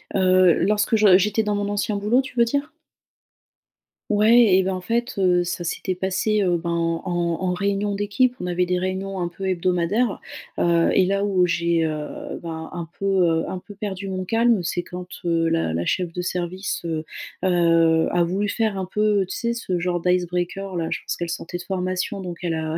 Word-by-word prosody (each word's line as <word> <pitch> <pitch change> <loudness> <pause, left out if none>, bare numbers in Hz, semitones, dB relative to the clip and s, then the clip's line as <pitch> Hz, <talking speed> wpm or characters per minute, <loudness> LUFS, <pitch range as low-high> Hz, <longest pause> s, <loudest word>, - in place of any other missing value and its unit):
Heu, 185 -2 +5
lorsque 210 +2 +2
je 205 -4 +6
j'étais 210 +3 +1
dans 210 0 -1
mon 205 0 -1
ancien 205 +1 -1
boulot, 215 +6 +2
tu 265 -1 -11
veux 235 - +5
dire? 285 +5 -2 1.4
Ouais, 215 -1 +5
et 190 - +4
ben, 190 0 -1
en 185 - -3
fait, 235 +6 -2
heu, 180 -2 +3
ça 175 0 -4
s'était 185 +2 -2
passé, 190 +3 0
heu, 180 -3 +2
ben, 170 +1 -4 0.3
en 180 - -4 0.3
en 180 -1 0
réunion 200 +1 -1
d'équipe. 205 +5 +1
On - - -4
avait 180 0 +1
des 180 0 0
réunions 190 +1 -3
un 175 - -1
peu 190 +2 -6
hebdomadaires, 185 +5 0 0.4
heu, - - +1
heu, 170 -1 +3
et 190 - +4
là, 200 +1 0
où 185 -3 +3
j'ai, 170 -1 +1
heu, 155 -1 -5
bah, 160 -1 -6
un 170 -2 -5
peu, 195 - -4
heu, 175 -4 +2
un 185 - -4
peu 205 - -13
perdu 200 -2 -5
mon 185 -1 -3
calme, 225 0 +2
c'est 175 +1 -1
quand, 180 +1 -8 0.2
heu, 165 -1 +2
la 165 - 0
la 85 +1 -1
cheffe 180 -3 -1
de 180 - -3
service, 180 +1 -3
heu, 160 -2 -2 0.4
heu, 165 -2 +3
a 175 -1 +2
voulu 190 +4 -1
faire 215 -1 -1
un 190 - -2
peu, 210 +1 +1
tu - - -5
sais, 235 -1 -1
ce 190 -6 -2
genre 175 0 -1
d' 170 - -15
icebreaker, 180 +2 -1
là. 165 -1 -1
Je - - -3
pense - - -4
qu'elle 170 -1 -4
sortait 175 0 -4
de 180 - -8
formation, 185 +2 -2
donc 175 -2 -6
elle 170 - -1
a 160 0 -2
185 Hz, 210 wpm, -23 LUFS, 175-205 Hz, 1.4 s, je